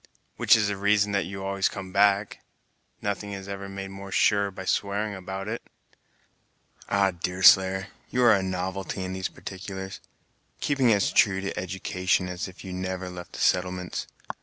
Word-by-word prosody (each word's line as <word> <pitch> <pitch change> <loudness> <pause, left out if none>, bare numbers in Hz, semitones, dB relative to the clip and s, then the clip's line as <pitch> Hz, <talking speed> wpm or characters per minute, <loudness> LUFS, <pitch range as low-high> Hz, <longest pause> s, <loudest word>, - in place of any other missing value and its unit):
"Which - - +6
is 110 -2 +2
the 100 -1 -2
reason 100 +1 +3
that 100 -2 0
you 95 +1 -6
always 95 0 +1
come 95 -2 -7
back? 100 +1 +3 0.6
Nothing 100 0 -2
is 95 0 -7
ever 100 0 -6
made 95 0 -6
more 95 0 -9
sure 100 0 +3
by 95 -1 -8
swearing 100 +2 0
about 95 +1 -6
it." 115 +2 -3 1.3
"Ah, 100 -1 +3
Deerslayer, 95 +2 +4 0.2
you 125 - +1
are 120 -2 +7
a 100 - +2
novelty 95 +1 -3
in 95 0 -4
these 95 0 -2
particulars; 95 0 -7 0.6
keeping 135 -5 +2
as 100 -2 +3
true 95 -2 +4
to 100 - -4
education 90 0 -1
as 90 +1 -4
if 95 0 -12
you 95 - -7
had 90 0 -4
never 95 0 -4
left 90 -1 -9
the - - -7
settlements. 90 0 0
95 Hz, 170 wpm, -26 LUFS, 95-100 Hz, 1.3 s, are